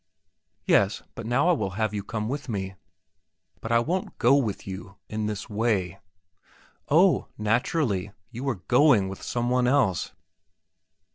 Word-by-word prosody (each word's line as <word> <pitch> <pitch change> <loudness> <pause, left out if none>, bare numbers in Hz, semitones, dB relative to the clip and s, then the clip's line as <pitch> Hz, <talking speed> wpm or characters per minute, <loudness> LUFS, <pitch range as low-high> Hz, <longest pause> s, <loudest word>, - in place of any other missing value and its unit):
"Yes; 100 +1 +3
but 115 - -7
now 130 +7 +2
I - - +6
will 140 - 0
have 110 -1 0
you 100 -1 -3
come 110 0 -3
with 135 +1 -4
me." 95 -3 -3 0.9
"But 115 - -6
I 115 - +5
won't 175 +11 -2
go 125 +4 +5
with 115 -8 -1
you 100 +1 -8
in 110 0 -3
this 105 -2 -4
way." 100 -4 -1 0.9
"Oh, 170 0 +4
naturally; 105 - 0 0.2
you 125 +3 -3
are 125 - 0
going 125 -7 +4
with 95 - -8
some 120 0 -2
one 125 -1 +2
else." 125 -10 +1
115 Hz, 150 wpm, -26 LUFS, 100-130 Hz, 0.9 s, I